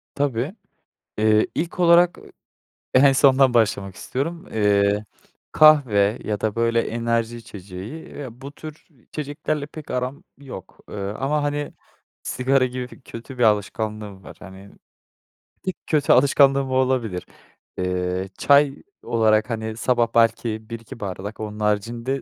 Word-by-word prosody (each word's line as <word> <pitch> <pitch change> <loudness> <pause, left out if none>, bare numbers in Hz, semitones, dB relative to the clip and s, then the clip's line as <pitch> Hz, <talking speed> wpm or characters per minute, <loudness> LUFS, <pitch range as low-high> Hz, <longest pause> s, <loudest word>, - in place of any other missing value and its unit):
Tabii. 140 - -1 0.6
Eee, 110 0 +3
ilk 170 +3 -3
olarak, 175 0 +5
ııı, - - -15 0.6
en 135 +1 +6
sondan 135 -1 +4
başlamak 100 -4 +1
istiyorum. 165 - -4
Eee, 105 -1 +2 0.5
kahve 125 -9 +5
ya 105 -1 -2
da, 110 -2 -1
böyle, 115 0 +2
enerji 115 0 -1
içeceği, 100 - -9
eee, 140 -3 -8
bu 135 +5 -11
tür 155 +1 -11 0.2
içeceklerle 145 0 -4
pek 150 0 -11
aram 125 +2 -3 0.2
yok, 135 -9 -11
eee, - - -7
ama, 135 +10 -2
hani, 145 0 -2 0.5
sigara 130 +1 +1
gibi 125 0 -7
kötü 125 +2 -10
bir - - 0
alışkanlığım 105 -2 -1
var. - - -11
Hani, 95 +1 -12 1.0
tek 185 - -2
kötü 150 -3 +3
alışkanlığım 135 0 +4
o - - -1
olabilir. 125 -8 0 0.5
Eee, 90 0 -2
çay 140 -1 +4 0.3
olarak, 110 -1 +2
hani, 110 -1 -4
sabah 120 -1 +2
belki 110 -1 +1
1-2 115 0 -8
bardak. 100 +2 -6
Onun 105 0 -6
haricinde 115 +5 -1
115 Hz, 130 wpm, -22 LUFS, 105-140 Hz, 1.0 s, en